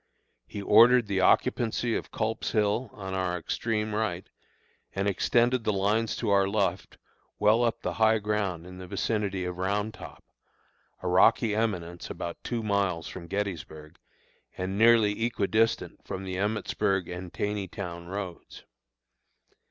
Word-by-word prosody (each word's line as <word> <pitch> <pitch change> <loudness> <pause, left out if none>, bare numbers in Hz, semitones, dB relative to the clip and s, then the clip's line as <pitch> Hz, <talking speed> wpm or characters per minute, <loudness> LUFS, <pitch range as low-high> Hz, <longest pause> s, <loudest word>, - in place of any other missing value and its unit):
He 100 - -6
ordered 120 +4 +6
the 100 -2 -1
occupancy 120 +3 +2
of - - -4
Culp's 110 0 -2
Hill 110 +3 +1
on 95 -2 -7
our 95 -2 -1
extreme 110 +5 -2
right, 105 -5 -2 0.7
and 100 +1 0
extended 120 +5 +2
the 110 - +1
lines 105 +3 +1
to 110 -4 -1
our 100 -1 +4
left 100 -3 -1 0.4
well 110 +3 +4
up 115 -1 0
the - - -2
high 110 0 +5
ground 100 -5 -2
in 90 0 -10
the 90 - -8
vicinity 100 -2 -1
of 90 0 -5
Round 105 +3 -1
Top, - - -11 0.8
a - - -2
rocky 105 +5 +4
eminence 90 -6 -2
about 85 0 -6
two 120 -2 -3
miles 100 -5 0
from 85 -2 -8
Gettysburg, 85 -6 -5 0.6
and 95 +1 -3
nearly 110 -1 +4
equi 115 -4 0
distant 115 +3 0
from 95 -1 -5
the 95 -1 -5
Emmitsburg 95 -2 0
and 90 0 -7
Taneytown 95 -4 -4
roads. 95 -2 -7
100 Hz, 145 wpm, -28 LUFS, 95-110 Hz, 0.8 s, ordered